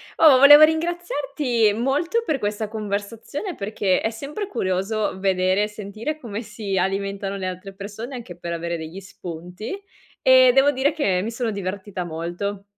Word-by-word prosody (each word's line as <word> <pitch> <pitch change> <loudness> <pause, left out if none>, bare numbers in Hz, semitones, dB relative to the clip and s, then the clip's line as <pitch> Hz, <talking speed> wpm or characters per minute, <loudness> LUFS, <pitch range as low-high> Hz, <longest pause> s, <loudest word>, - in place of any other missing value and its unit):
Oh, 295 -5 +7
volevo 290 +2 +10
ringraziarti 295 -8 +1
molto 295 - 0
per 300 -8 0
questa 210 0 -2
conversazione, 220 - -4
perché 200 - 0
è 220 - 0
sempre 285 - -6
curioso 195 - -1
vedere 190 0 +2
e - - 0
sentire 215 +7 -5
come 225 -7 -6
si 210 -3 -5
alimentano 195 +1 -2
le 190 - -4
altre 185 +1 -6
persone 210 +6 -7
anche 225 -8 -8
per 170 0 -5
avere 170 0 -3
degli 160 +3 -7
spunti, 180 - -8 0.4
e 255 -1 +7
devo 275 +2 +6
dire 275 +2 +1
che 200 - 0
mi 215 - -3
sono 235 0 -2
divertita 195 -1 -4
molto. 175 +5 -4
210 Hz, 155 wpm, -23 LUFS, 190-265 Hz, 0.4 s, volevo